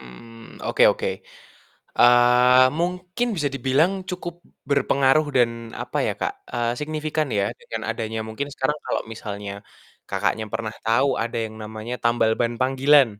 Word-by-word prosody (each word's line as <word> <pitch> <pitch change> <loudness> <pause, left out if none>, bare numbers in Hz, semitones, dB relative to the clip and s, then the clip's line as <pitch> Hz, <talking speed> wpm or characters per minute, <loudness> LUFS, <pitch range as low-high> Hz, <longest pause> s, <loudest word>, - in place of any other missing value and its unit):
Mmm, 115 - -13
oke - - +1
oke. 480 0 -3 0.9
Eee, 125 +1 +6
mungkin 180 +7 -1
bisa 150 -4 0
dibilang 135 +8 +2 0.2
cukup 175 -1 -5 0.4
berpengaruh 140 +1 +3
dan 120 -2 +4 0.3
apa - - -4
ya, - - 0
Kak, - - -1 0.2
eee, 120 -1 0
signifikan 155 0 -2
ya, 100 - +2 0.2
dengan 475 +1 -6
adanya 110 -1 -3
mungkin 140 +6 -4
sekarang 140 +3 -1
kalau - - -1
misalnya 100 -2 -6 0.6
Kakaknya 110 0 0
pernah 110 -1 -3
tahu, 115 +5 +3
ada 115 0 -3
yang 110 0 -7
namanya 110 +2 -6
tambal 120 -1 +3
ban 120 0 0
panggilan? 135 +2 +5
125 Hz, 140 wpm, -23 LUFS, 115-150 Hz, 0.9 s, Eee